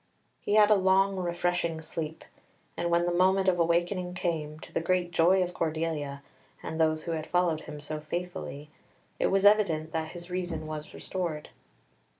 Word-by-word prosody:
He 205 - 0
had 215 0 +6
a - - +8
long, 195 0 +3
refreshing 175 -2 -1
sleep, 160 0 -6 0.5
and 170 - -1
when 170 0 +3
the 175 - +1
moment 190 +2 +3
of 180 -2 +3
awakening 175 +2 +1
came, 155 -4 -2
to - - -12
the - - 0
great 175 0 0
joy 175 +3 +4
of 180 0 -4
Cordelia 155 -4 -2 0.4
and 160 +1 -3
those 155 0 +2
who 170 - -4
had 160 -1 -3
followed 175 -3 +1
him 150 - -8
so 155 +1 -5
faithfully, 150 -3 -5 0.5
it - - +3
was 195 +1 +2
evident 175 -7 +4
that 160 -1 -3
his 175 0 -9
reason 175 -3 -3
was 155 -1 -6
restored. 170 -5 -4
170 Hz, 170 wpm, -29 LUFS, 155-180 Hz, 0.5 s, a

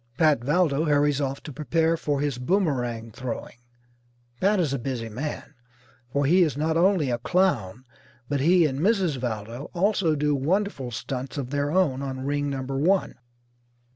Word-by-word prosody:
Pat 150 -7 +3
Valdo 155 +1 +2
hurries 145 -1 +2
off 135 0 -3
to 150 - -8
prepare 160 +4 +1
for 145 -3 -1
his 145 -4 -1
boomerang 125 - -1
throwing. 120 0 -6 0.8
Pat 200 +1 +3
is 155 -6 +1
a 140 - -1
busy 120 -2 -4
man, 145 +6 -5 0.6
for 140 +1 +1
he 175 +7 +4
is 155 -6 +2
not 160 +2 0
only 170 -5 +3
a 120 - -1
clown, 125 - 0 0.4
but 145 +1 -1
he 170 +4 +4
and 135 -2 -1
Mrs. 185 -5 +2
Valdo 120 +1 -5
also 185 -3 +2
do 150 0 +1
wonderful 150 -1 -1
stunts 130 +4 -5
of 135 -2 -4
their 145 0 0
own 150 -6 +1
on 130 -1 -4
Ring 145 0 -1
Number 135 0 -3
One. 185 +6 +2
145 Hz, 165 wpm, -25 LUFS, 130-165 Hz, 0.8 s, he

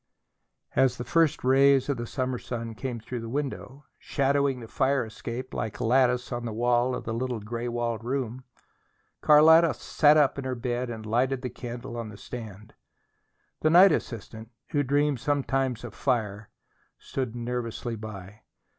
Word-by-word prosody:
As 130 -2 +3
the 120 - -4
first 165 0 +2
rays 135 +1 +4
of 140 -3 -1
the 120 0 -5
summer 130 -1 -2
sun 115 -2 -5
came 120 +1 -5
through 120 +3 -6
the 115 0 -6
window, 140 +1 -5
shadowing 140 -1 +1
the 115 - -9
fire 135 +1 +1
escape 115 +3 -7
like 105 0 -4
a - - -2
lattice 125 +1 +2
on 120 -1 -3
the 115 - -4
wall 120 +2 +1
of - - -5
the 115 -2 -4
little 125 0 -2
gray 115 +3 -5
walled 120 -2 -2
room, 130 0 -3 0.8
Carlotta 160 +2 +6
sat 150 -1 +4
up 145 -2 +3
in - - -4
her 130 -1 -2
bed 120 0 -2
and 110 -2 -6
lighted 125 +4 0
the 125 - -3
candle 120 0 -7
on 115 -2 -5
the 105 - -11
stand. 110 -1 -9 0.9
The 155 - +2
night 180 +4 +8
assistant, 110 -4 -4 0.2
who 145 - +1
dreamed 145 0 +1
sometimes 135 -3 -1
of 120 -3 -7
fire, 110 -6 -1 0.5
stood 130 -4 -4
nervously 120 -1 -4
by. 105 -1 -9
125 Hz, 165 wpm, -27 LUFS, 115-135 Hz, 0.9 s, night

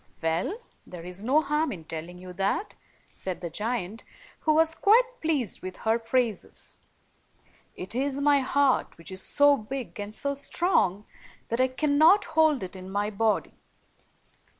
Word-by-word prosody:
"Well, 165 - -1 0.3
there 175 -2 -10
is 180 +3 -7
no 275 +7 +3
harm 300 +2 0
in 170 -4 -7
telling 165 +2 -7
you 180 0 -10
that," 195 - -1 0.4
said 185 -2 -5
the 170 -2 -6
giant, 220 +1 -3 0.4
who 310 - +2
was 320 0 +4
quite 485 +8 +3
pleased 295 - -1
with 185 0 -7
her 225 +1 +1
praises. 230 -3 -2 0.5
" - - -37 0.3
It 185 - -7
is 270 +2 -1
my 285 0 +4
heart, 275 0 +1
which 165 +3 -10
is 190 0 -2
so 285 0 +5
big 255 0 -6
and 205 +1 -6
so 280 0 0
strong 275 - +1 0.4
that 230 +2 0
I 260 - +4
cannot 305 +9 +4
hold 315 -6 +3
it 185 +1 -7
in 185 0 -9
my 205 +2 -1
body." 215 +1 0
235 Hz, 160 wpm, -27 LUFS, 190-290 Hz, 0.5 s, so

